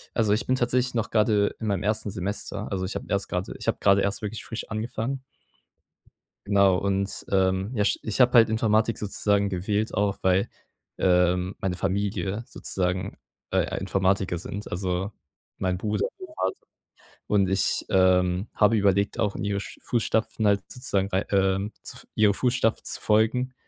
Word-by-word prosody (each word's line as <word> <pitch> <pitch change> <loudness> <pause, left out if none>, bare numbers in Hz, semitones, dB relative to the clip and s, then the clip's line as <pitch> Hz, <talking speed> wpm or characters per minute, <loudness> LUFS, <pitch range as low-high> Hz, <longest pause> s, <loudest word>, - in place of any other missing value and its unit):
Also, 110 -3 +2
ich 110 +4 +1
bin 130 - +2
tatsächlich 125 0 +1
noch 115 -2 -1
grade 105 -2 +2
in 110 - -4
meinem 100 -3 0
1. 105 -1 -1
Semester. 100 +2 -4
Also, 95 -1 -1
ich 95 - -4
habe - - -4
erst 100 -1 -1
grade 90 +1 -3
ich - - -9
habe - - +1
grade 100 0 +5
erst 100 +1 -1
wirklich 105 +1 -5
frisch 115 - -6
angefangen. 115 +4 -3 1.2
Genau, 100 -2 +4
und, 100 0 -1
ähm, 95 +2 +1
ja, 105 -3 +1
sch - - +1
ich 110 - -3
habe 125 0 +5
halt 115 -2 +7
Informatik 110 0 +2
sozusagen 100 0 +1
gewählt 100 +4 -1
auch, 100 0 0
weil, 95 +1 +2 0.5
ähm, 90 +1 +2
meine 95 -1 -2
Familie 100 +3 -1
sozusagen, 90 +1 -3 0.3
äh, - - 0
Informatiker 95 -1 0
sind, 100 +4 -6
also 95 +2 -2 0.5
mein 90 -1 -1
Bruder, 105 0 -1
mein 375 - -8
Vater. 390 - -1 0.7
Und 100 -2 +2
ich, 95 0 +1
ähm, 95 +1 +3
habe 110 +1 +4
überlegt, 100 0 +2
auch 105 -3 0
in - - -4
ihre 100 -1 -1
sch - - -9
Fußstapfen 110 -2 0
halt 100 -1 +3
sozusagen 100 -6 -1
rei, 95 +1 0
ähm, 95 +1 +1
zu - - -9
f - - -14
ihren 105 -2 +4
Fußstapfen 125 -2 0
zu - - -4
folgen, 115 +4 +2
100 Hz, 170 wpm, -26 LUFS, 95-110 Hz, 1.2 s, halt